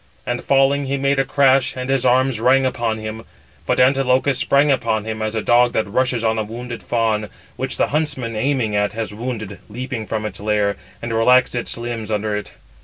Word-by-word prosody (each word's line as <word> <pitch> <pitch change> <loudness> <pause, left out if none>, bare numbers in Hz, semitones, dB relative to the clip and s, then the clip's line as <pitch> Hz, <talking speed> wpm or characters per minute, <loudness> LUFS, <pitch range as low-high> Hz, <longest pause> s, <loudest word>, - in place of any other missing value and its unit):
And 120 0 -3
falling, 140 +1 +2
he 140 +1 -1
made 140 0 +1
a - - +4
crash, 135 -2 +3
and 125 0 -4
his 135 -1 +1
arms 130 -1 +2
rang 130 +3 +4
upon 115 -3 -1
him. 110 +1 -6 0.4
But - - +1
Antilochus 130 0 +3
sprang 140 +1 +3
upon 110 -5 0
him, 110 0 -4
as 110 +1 -2
a 110 - -1
dog 120 0 +4
that 110 - +1
rushes 125 +2 0
on 110 0 +1
a - - 0
wounded 120 +2 -7
fawn, 110 -3 0 0.3
which 130 0 -3
the - - +1
huntsman 135 -6 -2
aiming 115 -2 0
at, 105 0 +1
has 110 -1 -4
wounded, 110 -4 -5
leaping 125 -1 -5
from 110 -1 -3
its 105 -3 -5
lair, 105 -1 0 0.3
and 115 -1 -3
relaxed 125 +3 +4
its 120 -1 -2
limbs 115 -2 -5
under 105 0 -1
it. 105 - -5
120 Hz, 200 wpm, -20 LUFS, 110-130 Hz, 0.4 s, a